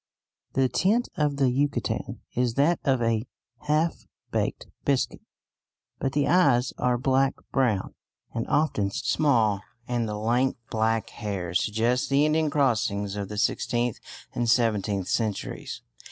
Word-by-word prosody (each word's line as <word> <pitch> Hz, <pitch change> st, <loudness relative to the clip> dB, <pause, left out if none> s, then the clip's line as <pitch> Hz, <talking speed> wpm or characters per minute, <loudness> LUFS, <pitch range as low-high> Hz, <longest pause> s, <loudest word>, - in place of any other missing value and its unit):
The 135 Hz, -1 st, +3 dB
tint 215 Hz, -, +1 dB
of 145 Hz, -2 st, 0 dB
the 140 Hz, -, +1 dB
Yucatecan 140 Hz, +3 st, -1 dB
is 125 Hz, -1 st, 0 dB
that 155 Hz, +5 st, +3 dB
of 130 Hz, -4 st, +2 dB
a 115 Hz, +1 st, 0 dB, 0.4 s
half 155 Hz, +3 st, +1 dB, 0.2 s
baked -, -, -1 dB, 0.2 s
biscuit, 140 Hz, -2 st, 0 dB, 0.8 s
but 135 Hz, -, -1 dB
the 145 Hz, -1 st, +2 dB
eyes 135 Hz, -8 st, +4 dB
are 125 Hz, -1 st, +2 dB
black 135 Hz, +1 st, +2 dB, 0.2 s
brown 115 Hz, -8 st, +1 dB, 0.4 s
and 115 Hz, -1 st, -2 dB
often 125 Hz, -10 st, +1 dB
small, 110 Hz, -4 st, +2 dB, 0.3 s
and 120 Hz, -2 st, -1 dB
the 105 Hz, -, -3 dB
lank 120 Hz, +5 st, +1 dB
black 110 Hz, 0 st, 0 dB
hair 100 Hz, -6 st, -4 dB
suggests 110 Hz, +6 st, +1 dB
the 140 Hz, +2 st, +3 dB
Indian 155 Hz, 0 st, +2 dB
crossings 110 Hz, -8 st, +1 dB
of 100 Hz, -2 st, -4 dB
the 105 Hz, -, -6 dB
sixteenth 120 Hz, +2 st, 0 dB, 0.3 s
and 120 Hz, -1 st, 0 dB
seventeenth 105 Hz, -5 st, +1 dB
centuries. 110 Hz, -4 st, -2 dB
120 Hz, 135 wpm, -26 LUFS, 110-140 Hz, 0.8 s, eyes